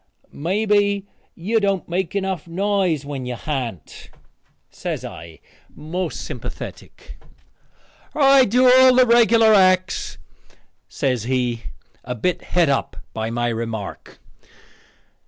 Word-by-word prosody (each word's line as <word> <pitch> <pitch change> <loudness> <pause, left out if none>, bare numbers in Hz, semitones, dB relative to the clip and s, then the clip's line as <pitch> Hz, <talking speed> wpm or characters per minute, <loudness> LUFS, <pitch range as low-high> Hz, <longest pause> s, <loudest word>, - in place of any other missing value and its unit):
"Mebbe 205 +4 +1 0.3
you 215 +7 0
don't 195 -3 -1
make 180 +1 -3
enough 190 -4 -3
noise 185 -4 0
when 135 -3 -5
you 125 - -4
ha'nt," 120 - -6 0.6
says - - -5
I 85 -1 -10 0.4
most 175 +4 -4
sympathetic. - - -9 1.0
"I 275 -2 +6
do 250 +4 +2
all 255 0 +7
the 255 0 +6
regular 230 -2 +5
acts," 185 -1 +2 0.7
says 125 -5 -2
he, 125 -2 -1 0.4
a 125 - -5
bit 175 +10 -1
het 175 -2 +1
up 140 -1 -1 0.2
by 110 0 -3
my 120 +1 -1
remark. 115 -3 -6
180 Hz, 110 wpm, -21 LUFS, 125-205 Hz, 1.0 s, all